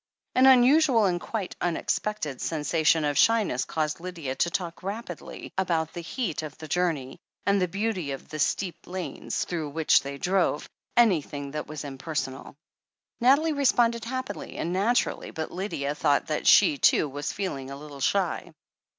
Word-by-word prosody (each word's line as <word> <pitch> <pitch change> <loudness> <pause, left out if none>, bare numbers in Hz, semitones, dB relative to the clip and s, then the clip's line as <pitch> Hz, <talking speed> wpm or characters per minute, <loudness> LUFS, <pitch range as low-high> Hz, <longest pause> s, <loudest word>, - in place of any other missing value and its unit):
An 255 +1 +6
unusual, 260 -2 +6
and 175 -2 0
quite 215 -5 -4
unexpected, 175 -3 -2
sensation 160 0 +1
of 145 -1 +1
shy 225 -1 +5
ness 125 -9 -2
caused 155 0 -2
Lydia 170 -6 -5
to 170 - +1
talk 170 -1 -4
rapidly 195 -2 -7
about 165 -4 0
the 175 - -5
heat 175 - -3
of 150 -3 -8
the 155 - -9
journey, 155 -6 -1 0.3
and 200 -1 +3
the 180 - +2
beauty 195 -3 -2
of 135 -1 -6
the 155 0 -7
steep 170 +2 -1
lanes 185 -1 -4
through 160 -4 -3
which 160 +2 +3
they 140 0 -6
drove 180 -1 +1 0.2
— - - -38
^anything 150 -11 +2
that 150 +1 -4
was 155 0 -6
impersonal. 135 -1 -5 0.6
Nathalie 280 +6 +4
responded 240 -5 +2
happily 255 -3 -5
and 170 - -2
naturally, 220 +6 +1
but 160 0 -5
Lydia 175 -7 -3
thought 145 -1 +2
that 155 - -2
she, 145 - +6
too, - - +4
was 145 +1 -4
feeling 140 -10 -4
a 140 - -7
little 145 -1 -10
shy. 180 +2 0
170 Hz, 165 wpm, -27 LUFS, 150-205 Hz, 0.6 s, An